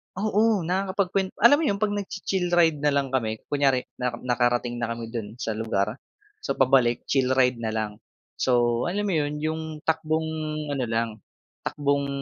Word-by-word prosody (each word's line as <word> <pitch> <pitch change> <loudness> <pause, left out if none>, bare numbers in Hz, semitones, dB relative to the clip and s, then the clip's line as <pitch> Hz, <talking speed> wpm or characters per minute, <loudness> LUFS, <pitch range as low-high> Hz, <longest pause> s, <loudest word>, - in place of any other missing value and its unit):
Oo, 210 0 +2
nakakapagkwen 190 +1 0 0.2
alam 285 +5 +8
mo 325 - 0
'yon 200 - +2
'pag 210 +1 0
nag-chi-chill 195 -2 -2
ride 165 -3 +4
na 150 - +1
lang 140 -2 0
kami 110 -5 0 0.2
kunyari 135 -3 +2 0.2
na 125 -1 -1
nakarating 120 -1 +1
na 115 -1 -2
kami 115 -1 -7
dun 110 -2 -5
sa 115 - -3
lugar, 110 +1 -1 0.4
so - - -3
pabalik 130 -3 +3
chill 130 -1 +1
ride 125 -2 +3
na 115 - -3
lang 105 -1 -3 0.4
so 120 -2 +2
alam 205 +4 -1
mo - - 0
yun 150 -1 0
yung 160 +1 -1 0.2
takbong 160 0 0 0.4
ano 135 -3 -1
lang, 115 +1 0 0.6
takbong 140 -1 0
135 Hz, 165 wpm, -25 LUFS, 120-175 Hz, 0.6 s, alam